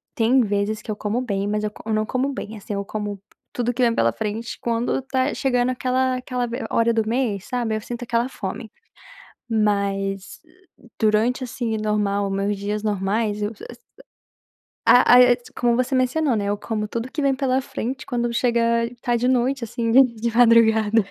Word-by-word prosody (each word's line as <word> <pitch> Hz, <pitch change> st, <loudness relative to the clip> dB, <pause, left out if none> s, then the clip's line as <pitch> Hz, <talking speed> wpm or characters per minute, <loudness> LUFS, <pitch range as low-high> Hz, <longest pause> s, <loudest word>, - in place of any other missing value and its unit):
tem 245 Hz, +1 st, +3 dB
vezes 210 Hz, 0 st, -1 dB
que -, -, -14 dB
eu 215 Hz, -, -1 dB
como 210 Hz, +3 st, -2 dB
bem, 200 Hz, -5 st, -2 dB
mas 210 Hz, 0 st, -1 dB
eu -, -, -1 dB
co -, -, -14 dB
eu -, -, +1 dB
não 215 Hz, 0 st, +1 dB
como 260 Hz, +4 st, -1 dB
bem, 225 Hz, -5 st, -6 dB
assim, 205 Hz, 0 st, -6 dB
eu 200 Hz, 0 st, -3 dB
como 205 Hz, -1 st, -5 dB, 0.3 s
tudo 245 Hz, 0 st, -1 dB
que 250 Hz, -, -2 dB
vem 235 Hz, -1 st, +3 dB
pela 115 Hz, -, +2 dB
frente 220 Hz, +2 st, -4 dB
quando 235 Hz, +2 st, -1 dB
tá 265 Hz, +1 st, -1 dB
chegando 250 Hz, -2 st, +1 dB
aquela 255 Hz, +1 st, 0 dB
aquela 250 Hz, -1 st, -3 dB
v 240 Hz, +3 st, -5 dB
hora 230 Hz, 0 st, +2 dB
do 225 Hz, -1 st, +1 dB
mês, 225 Hz, -5 st, -1 dB
sabe, 240 Hz, -4 st, -2 dB
eu 215 Hz, -, -3 dB
sinto 240 Hz, +2 st, -6 dB
aquela 235 Hz, +1 st, 0 dB
fome, 220 Hz, 0 st, -6 dB, 0.8 s
mas, 200 Hz, -3 st, -1 dB, 0.6 s
durante, 220 Hz, +4 st, +2 dB
assim, 235 Hz, -2 st, -3 dB
normal, 205 Hz, -2 st, 0 dB
meus 195 Hz, +1 st, -1 dB
dias 205 Hz, +1 st, -3 dB
normais, 210 Hz, +1 st, -1 dB
eu 205 Hz, +1 st, -1 dB, 1.4 s
a 245 Hz, 0 st, +7 dB, 0.2 s
a -, -, +2 dB, 0.2 s
como 240 Hz, -1 st, +3 dB
você 255 Hz, +2 st, 0 dB
mencionou, 255 Hz, +2 st, +1 dB
né, 205 Hz, -1 st, -1 dB
eu 205 Hz, +1 st, 0 dB
como 215 Hz, 0 st, -3 dB
tudo 230 Hz, +3 st, -4 dB
que 310 Hz, -, -3 dB
vem 275 Hz, -1 st, +2 dB
pela 260 Hz, -1 st, +1 dB
frente 260 Hz, 0 st, -5 dB
quando 240 Hz, -2 st, -1 dB
chega, 235 Hz, -1 st, +1 dB
tá 240 Hz, -2 st, 0 dB
de 245 Hz, +2 st, 0 dB
noite, 255 Hz, +1 st, +1 dB
assim, 230 Hz, 0 st, -2 dB
dentro 255 Hz, -2 st, +5 dB
de 230 Hz, +1 st, -2 dB
madrugada 225 Hz, -2 st, +5 dB
230 Hz, 185 wpm, -22 LUFS, 210-250 Hz, 1.4 s, a